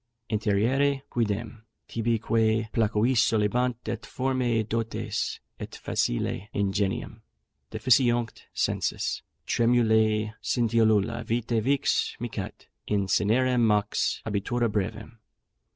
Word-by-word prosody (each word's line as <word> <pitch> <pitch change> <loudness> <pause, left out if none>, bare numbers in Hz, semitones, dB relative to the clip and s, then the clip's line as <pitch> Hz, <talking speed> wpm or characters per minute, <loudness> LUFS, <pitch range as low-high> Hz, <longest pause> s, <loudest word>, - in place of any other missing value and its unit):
Interiêre 120 +7 +1
quidem, 110 -1 -2 0.3
tibi 115 0 0
quæ 110 0 +1
placuisse 115 +2 +2
solebant, 115 +3 +1
Et 115 +1 -3
formæ 125 -5 0
dotes, 115 0 -2 0.2
et - - -7
facile 95 +10 -1
ingenium: 100 0 -1 0.5
Deficiunt 120 0 +2
sensus, - - -1 0.2
tremulæ 110 -2 +2
scintillula 115 -1 +2
vitæ 115 0 0
Vix 140 +4 +1
micat, 115 -4 -6 0.2
in 100 -2 +1
cinerem 120 +6 +2
mox 105 -2 +2
abitura 110 +3 0
brevem. 110 +3 -4
115 Hz, 90 wpm, -27 LUFS, 105-120 Hz, 0.5 s, placuisse